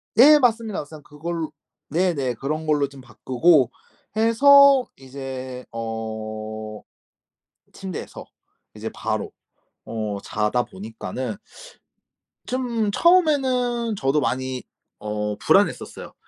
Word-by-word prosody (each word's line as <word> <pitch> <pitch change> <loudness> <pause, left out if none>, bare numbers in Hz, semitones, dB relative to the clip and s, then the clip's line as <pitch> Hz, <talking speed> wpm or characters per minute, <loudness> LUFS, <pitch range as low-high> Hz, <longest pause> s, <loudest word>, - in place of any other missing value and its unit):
네. 295 +5 +8
맞습니다, 230 -5 +1
맞습니다. 150 0 -10
그걸 160 +2 -4 0.4
네네. 150 -7 0
그런 155 +6 -3
걸로 150 -2 +2
좀 140 -1 -13
바꾸고 130 +4 +2 0.4
해서 275 +4 +6
이제 130 -1 -7
어 110 -1 -5 0.9
침대에서 190 -3 -7 0.5
이제 - - -6
바로 - - -3 0.6
어 105 -3 -3
자다 105 +4 0
보니까는 110 +3 -6 1.1
좀 240 -4 -1
처음에는 255 - +2
저도 140 -1 +1
많이 130 0 -2 0.4
어 105 0 -3
불안했었어요. - - +1
140 Hz, 210 characters per minute, -23 LUFS, -, 1.1 s, 네